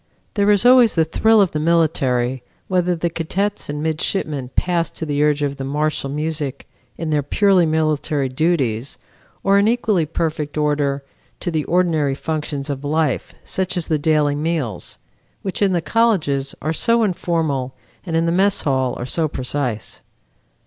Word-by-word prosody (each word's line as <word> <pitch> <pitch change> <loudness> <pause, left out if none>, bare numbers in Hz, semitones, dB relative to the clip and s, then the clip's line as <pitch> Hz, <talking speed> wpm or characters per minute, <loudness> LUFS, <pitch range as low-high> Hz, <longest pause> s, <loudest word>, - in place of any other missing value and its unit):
There 205 -1 +2
is 205 +1 +4
always 250 -3 +6
the 160 -2 +3
thrill 220 +7 +4
of 190 - +2
the 150 - -2
military 135 -6 +1 0.3
whether 180 -1 +1
the 170 +1 -1
cadets 195 +5 -2
and 150 +1 -3
midshipmen 155 -4 -2
pass 175 -2 +1
to 160 - -6
the 145 -1 -1
urge 150 -1 +2
of 140 -1 -2
martial 145 +1 -1
music 150 -1 -3 0.3
in 160 -1 -3
their 150 -1 +2
purely 185 +4 +3
military 155 -2 0
duties, 130 -4 -1 0.5
or 195 +1 +4
in 200 - +3
equally 215 -8 +1
perfect 155 -2 -3
order 145 -2 0 0.4
to 175 - -2
the 155 -2 -1
ordinary 160 -6 +1
functions 150 -2 -3
of 140 0 -5
life, 150 -1 -1
such 190 0 -2
as 170 - -1
the 155 -2 0
daily 150 -1 +2
meals, 145 - -2 0.5
which 190 0 -4
in 200 -2 +3
the 175 -2 +1
colleges 160 -13 +1
are 155 +2 0
so 230 +8 +2
informal 160 -9 -1 0.3
and 165 -4 -4
in 165 0 +2
the 165 - +1
mess 195 +3 +3
hall 130 -3 0
are 120 - -4
so 160 +5 0
precise. 125 -4 -3
155 Hz, 165 wpm, -20 LUFS, 145-175 Hz, 0.5 s, always